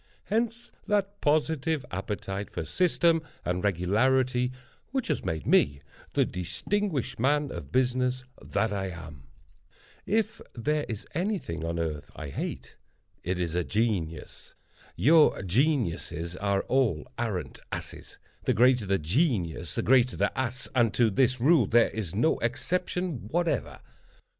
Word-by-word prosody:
Hence 230 +2 -1 0.2
that 205 -1 0
positive 155 0 +1
appetite 95 +1 -4
for - - -4
system 170 -2 +3 0.2
and 90 +1 -1
regularity 125 +7 +2 0.4
which 265 -5 -2
has 150 - 0
made 80 -1 -3
me 70 0 +3 0.3
the - - +3
distinguished 150 - -2
man 145 +2 +2
of 70 - -7
business 125 0 +1 0.2
that 110 -2 -1
I 95 -1 -2
am. 80 -7 -9 0.8
If 220 +1 0
there 150 +6 -1
is 110 -3 -5
any 195 +6 0
thing 85 - -6
on 85 0 -2
earth 80 -3 -3
I 75 -2 -6
hate, - - -5 0.5
it 90 +1 -1
is 85 -2 -2
a 90 0 +1
genius. 90 -8 -2 0.4
Your 155 +2 +5
geniuses 90 - 0
are 100 0 0
all 115 - +1
arrant - - -3
asses—the - - -5
greater 125 -2 +4
the 100 0 +2
genius 85 - 0
the - - 0
greater 125 0 +4
the - - 0
ass—and 125 -2 0
to 115 -3 +4
this 130 +4 +2
rule 135 - +5
there 115 +2 +4
is 95 -5 -4
no 120 +10 +2
exception 170 - -2
whatever. 170 +6 -1
120 Hz, 135 wpm, -28 LUFS, 90-150 Hz, 0.8 s, Your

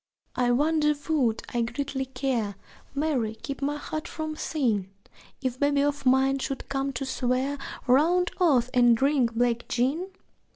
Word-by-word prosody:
(I 245 -1 +2
wonder 300 +4 +3
would 250 -8 +1
I 240 - +1
greatly 265 +3 -2
care 245 -6 -2 0.4
Mary, 270 -7 0
keep 275 +5 -7
my 290 +1 -1
heart 310 +1 -5
from 315 -1 -4
sin! 230 -12 -1 0.5
If 255 -1 -2
babe 285 0 +2
of 285 -1 +1
mine 265 +1 +4
should 270 0 -4
come 275 0 -1
to 270 +2 -3
swear 260 +2 -1 0.3
Round 335 +8 +3
oaths 260 -9 +3
and 240 -2 +5
drink 265 -3 +2
black 240 0 +1
gin?) 275 +10 0
270 Hz, 150 wpm, -27 LUFS, 245-290 Hz, 0.5 s, and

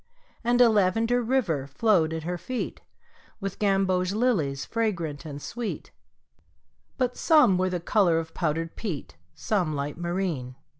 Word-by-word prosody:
And 240 +1 +2
a 245 - +8
lavender 225 +4 +2
river 220 - 0
flowed 160 +2 +2
at 160 -1 -4
her 175 +1 -3
feet 250 +8 -4 0.6
With 195 -2 -5
gamboge 195 -2 +2
lilies 180 - 0
fragrant 175 -10 -2
and 145 -2 -6
sweet, 230 +8 -5 1.1
But 250 -2 0
some 300 - +5
were 185 0 +2
the 180 -1 -2
color 175 -1 +3
of 160 0 -4
powdered 165 0 -2
peat, 175 - -5 0.2
Some 180 - 0
light 145 +3 -4
marine. 170 -8 -2
185 Hz, 140 wpm, -26 LUFS, 160-225 Hz, 1.1 s, a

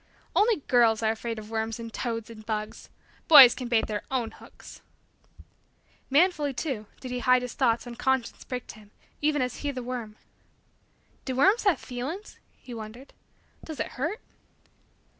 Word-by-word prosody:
"Only 425 -5 +3
girls 230 -3 +4
are 220 - +3
afraid 225 +1 -4
of 215 0 -9
worms 225 0 -2
and 230 -1 -8
toads 230 -2 -4
and 215 -1 -11
bugs. 215 -1 -5 0.4
Boys 275 -6 +10
can 250 - -6
bait 235 -2 +2
their 210 -1 -3
own 250 -4 -1
hooks." - - -14 1.3
Manfully, 295 -2 +2
too, 240 -9 -3
did 255 - -7
he 250 - -2
hide 255 0 +3
his 250 - -5
thoughts 235 -4 +1
when 240 - -7
conscience 265 -1 -1
pricked 250 -1 -6
him, 215 -1 -16 0.3
even 295 -2 +2
as 250 -1 -4
he 290 - -3
the 255 -3 -4
worm. 240 -4 -5 1.1
"Do 260 - -3
worms 390 - +4
have 390 -5 +3
feelin's?" 275 +12 -6 0.2
He 245 - -11
wondered. 230 +4 -9 0.5
"Does 315 -5 -8
it - - -2
hurt?" 325 - -3
250 Hz, 160 wpm, -27 LUFS, 225-275 Hz, 1.3 s, Boys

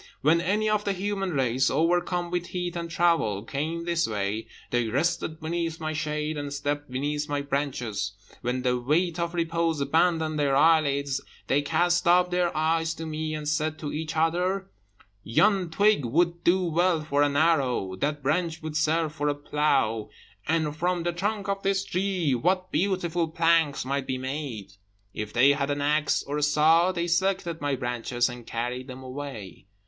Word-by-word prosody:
When 160 +4 +4
any 205 +5 +1
of 215 -1 +1
the 200 - 0
human 195 -1 -2
race, 130 -2 +2
overcome 175 +1 +1
with 175 -1 -2
heat 180 -1 -4
and 170 -1 -4
travel, 165 - +1
came 155 +7 -3
this 170 -1 +1
way, 105 +1 -2 0.2
they 120 -1 +1
rested 155 +5 -1
beneath 165 0 -3
my 155 -1 -3
shade, 150 0 -2
and 145 -1 -5
slept 145 0 -3
beneath 145 +3 -2
my 145 -1 -1
branches; 125 -8 -2 0.3
when 125 +1 -2
the 125 -1 +1
weight 165 +7 +1
of 170 +1 -2
repose 165 -1 0
abandoned 160 +2 +1
their 140 -2 +2
eyelids, 140 -3 +3 0.2
they 145 - +2
cast 175 +5 +1
up 180 +1 +4
their 180 -2 0
eyes 160 +1 +1
to 165 - -6
me, 155 0 -3
and 150 -1 -5
said 155 +1 0
to 150 -2 -5
each 155 0 -4
other, 180 +4 0 0.5
'Yon 190 - +2
twig 205 0 +3
would 170 +7 +1
do 185 +2 +3
well 170 -1 +1
for 145 -1 +1
an 145 -1 +2
arrow; 135 - +2
that 145 +7 -2
branch 160 +3 -1
would 155 -1 -5
serve 155 0 +1
for 150 -2 -2
a 145 - 0
plough; 135 -7 0 0.4
and 155 -2 0
from 175 +2 0
the 175 0 -1
trunk 200 +3 -2
of 195 0 -1
this 195 0 0
tree 185 -5 0
what 185 +8 0
beautiful 175 -3 0
planks 165 -3 +2
might 135 0 -2
be 130 - -1
made!' 130 -7 -5 0.4
If 105 0 -5
they 130 +4 +5
had 140 0 -1
an 145 0 -1
axe 150 +1 +1
or 145 +2 -3
a - - -3
saw, 155 +4 +4
they 170 -2 -2
selected 175 -2 0
my 145 -1 0
branches, 120 0 -1
and 120 -1 -9
carried 125 +2 -3
them 130 0 -9
away. 130 - -8
155 Hz, 175 wpm, -26 LUFS, 140-175 Hz, 0.5 s, they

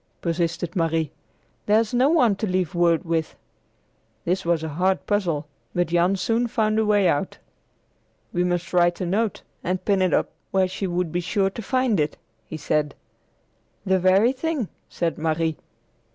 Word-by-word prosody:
persisted 170 0 -2
Marie. 165 -3 0 0.6
"There's 215 +2 +3
no 255 +3 +4
one 250 -11 +4
to 215 - -2
leave 185 -2 0
word 170 0 +2
with!" 165 -1 -1 0.9
This 185 +2 0
was 170 -2 +1
a 160 - -3
hard 185 +5 0
puzzle, 175 -8 0 0.3
but 175 -2 +1
Jan 175 +3 +3
soon 230 +5 0
found 215 -1 +1
a 220 - +2
way 205 -3 +4
out. 145 -4 0 1.0
"We 175 - +1
must 175 0 -2
write 175 -1 +3
a 185 - -1
note 205 +4 -1 0.2
and 185 +1 -2
pin 200 -2 +2
it 185 - +2
up - - +1 0.2
where 190 -1 +2
she 185 +1 -3
would 175 -2 -1
be 175 - 0
sure 195 +2 0
to 230 - -6
find 255 -2 +1
it," 150 0 -1 0.3
he 160 - -6
said. 150 0 -1 0.9
"The 190 -1 +3
very 190 +6 +4
thing," 270 - -2 0.2
said 170 -2 -2
Marie. 160 0 0
180 Hz, 165 wpm, -24 LUFS, 170-205 Hz, 1.0 s, no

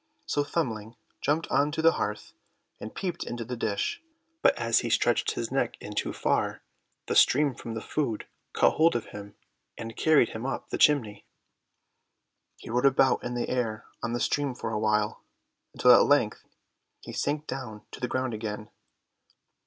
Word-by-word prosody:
So 145 - 0
Thumbling 115 -8 -3 0.3
jumped 150 +3 0
on 145 +1 +3
to 160 - -1
the 165 - +7
hearth, 105 -7 -4 0.5
and 110 - -8
peeped 180 -3 -3
into 120 -1 -5
the 125 +2 -4
dish, 110 - -2 0.4
but - - +4
as - - +2
he - - -3
stretched - - +2
his - - -4
neck - - 0
in - - -8
too - - -1
far - - -1 0.4
the 455 - -2
steam 150 - +5
from 115 -1 -7
the 110 - -5
food 125 -8 -2 0.3
caught - - +3
hold 165 -2 +4
of 120 - -1
him, 100 0 -9 0.4
and 115 0 -7
carried 155 -6 +4
him 110 - -6
up 135 +1 -4
the - - -2
chimney. 115 -9 +2 1.3
He - - -9
rode 125 +3 +3
about 135 0 +3
in 120 0 -3
the 120 - -1
air 115 -4 -2 0.2
on 120 - -2
the 120 - -1
steam 140 -1 0
for 115 - -4
a 105 - -1
while, 105 -1 0 0.5
until 125 - +6
at 120 - +9
length 140 -7 +2 0.6
he - - -9
sank 150 +1 -1
down 120 -7 -6
to - - -9
the 125 - -1
ground 130 0 -2
again. 105 -1 -5
120 Hz, 175 wpm, -28 LUFS, 110-145 Hz, 1.3 s, at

